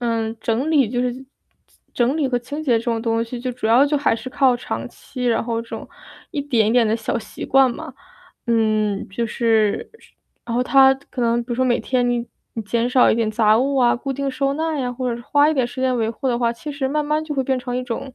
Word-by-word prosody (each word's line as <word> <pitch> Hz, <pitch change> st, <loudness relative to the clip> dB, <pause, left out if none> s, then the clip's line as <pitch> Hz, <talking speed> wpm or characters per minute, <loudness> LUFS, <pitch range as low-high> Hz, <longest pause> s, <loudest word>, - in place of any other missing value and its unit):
嗯， 230 Hz, -1 st, -1 dB
整 245 Hz, +7 st, -1 dB
理 285 Hz, -5 st, +4 dB
就 245 Hz, -, -1 dB
是 250 Hz, +2 st, -3 dB, 0.7 s
整 245 Hz, +3 st, +2 dB
理 290 Hz, -4 st, +1 dB
和 245 Hz, -, 0 dB
清 285 Hz, +6 st, -6 dB
洁 240 Hz, -6 st, +2 dB
这 230 Hz, -, -7 dB
种 230 Hz, -2 st, -1 dB
东 230 Hz, 0 st, 0 dB
西， 240 Hz, +1 st, -7 dB
就 255 Hz, -, -2 dB
主 240 Hz, -2 st, -4 dB
要 245 Hz, +6 st, +5 dB
就 295 Hz, +1 st, +1 dB
还 285 Hz, -4 st, +2 dB
是 255 Hz, -, -7 dB
靠 265 Hz, -2 st, +3 dB
长 -, -, -5 dB
期， 255 Hz, -3 st, -8 dB
然 230 Hz, -2 st, +2 dB
后 230 Hz, -1 st, -2 dB, 0.7 s
一 295 Hz, -5 st, -2 dB
点 230 Hz, -7 st, +2 dB
一 -, -, +2 dB
点 240 Hz, -2 st, +4 dB
的 215 Hz, -, +1 dB
小 225 Hz, +1 st, -2 dB
习 -, -, -10 dB
惯 265 Hz, -2 st, +4 dB
吧。 -, -, -8 dB, 0.5 s
嗯， 215 Hz, -3 st, +1 dB
就 230 Hz, +4 st, -2 dB
是 220 Hz, -3 st, +1 dB, 0.6 s
然 230 Hz, -, -3 dB
后 245 Hz, -, +2 dB
它 265 Hz, +1 st, +6 dB, 0.2 s
可 250 Hz, -, -3 dB
能 235 Hz, 0 st, +2 dB
比 245 Hz, -, -34 dB
如 -, -, 0 dB
说 260 Hz, -, +2 dB
每 240 Hz, -2 st, +2 dB
天 245 Hz, -1 st, 0 dB
你 240 Hz, -1 st, -1 dB, 0.4 s
减 235 Hz, +3 st, 0 dB
少 255 Hz, -1 st, +5 dB
一 -, -, +3 dB
点 225 Hz, -2 st, 0 dB
杂 215 Hz, 0 st, +3 dB
物 275 Hz, +2 st, 0 dB
啊， 245 Hz, -2 st, +4 dB
固 275 Hz, +3 st, -5 dB
定 275 Hz, +1 st, -2 dB
收 275 Hz, +1 st, -1 dB
纳 320 Hz, 0 st, -2 dB
呀， 250 Hz, -2 st, -1 dB
或 250 Hz, -1 st, -2 dB
者 235 Hz, -, -8 dB
花 290 Hz, +4 st, +3 dB
一 -, -, 0 dB
点 260 Hz, -4 st, +1 dB
时 250 Hz, +2 st, -8 dB
间 260 Hz, -1 st, +2 dB
维 225 Hz, -1 st, 0 dB
护 265 Hz, +4 st, -5 dB
的 240 Hz, -1 st, 0 dB
话， 235 Hz, -1 st, +2 dB
其 295 Hz, +5 st, -7 dB
实 275 Hz, -2 st, -2 dB
慢 300 Hz, +2 st, 0 dB
慢 300 Hz, +1 st, 0 dB
就 300 Hz, -2 st, -4 dB
会 265 Hz, -, 0 dB
变 260 Hz, 0 st, 0 dB
成 245 Hz, 0 st, -4 dB
一 255 Hz, -, -2 dB
种， 250 Hz, +2 st, -5 dB
245 Hz, 270 characters per minute, -21 LUFS, 230-270 Hz, 0.7 s, 它